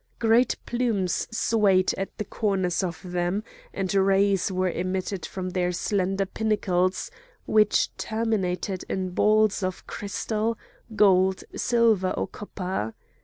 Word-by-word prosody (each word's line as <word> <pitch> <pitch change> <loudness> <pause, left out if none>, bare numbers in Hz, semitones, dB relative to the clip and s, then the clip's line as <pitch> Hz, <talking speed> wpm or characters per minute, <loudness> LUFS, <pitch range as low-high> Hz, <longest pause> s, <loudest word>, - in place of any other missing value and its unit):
Great 230 +2 +3
plumes 230 -7 0
swayed 210 -5 +2
at 195 - -5
the 210 - -3
corners 190 -4 0
of 175 -3 -3
them, 180 +3 -1 0.3
and 190 -1 -2
rays 195 0 +3
were 185 -1 0
emitted 185 +1 -3
from 185 -1 -5
their 180 0 0
slender 195 +1 0
pinnacles 190 -3 0 0.3
which 215 -1 +3
terminated 200 -4 -1
in 185 -1 -2
balls 215 +2 +3
of 185 -1 -3
crystal, 215 +2 -2 0.4
gold, 190 -2 +4
silver 225 -6 +2
or - - 0
copper. 185 - -5
195 Hz, 120 wpm, -26 LUFS, 185-215 Hz, 0.4 s, gold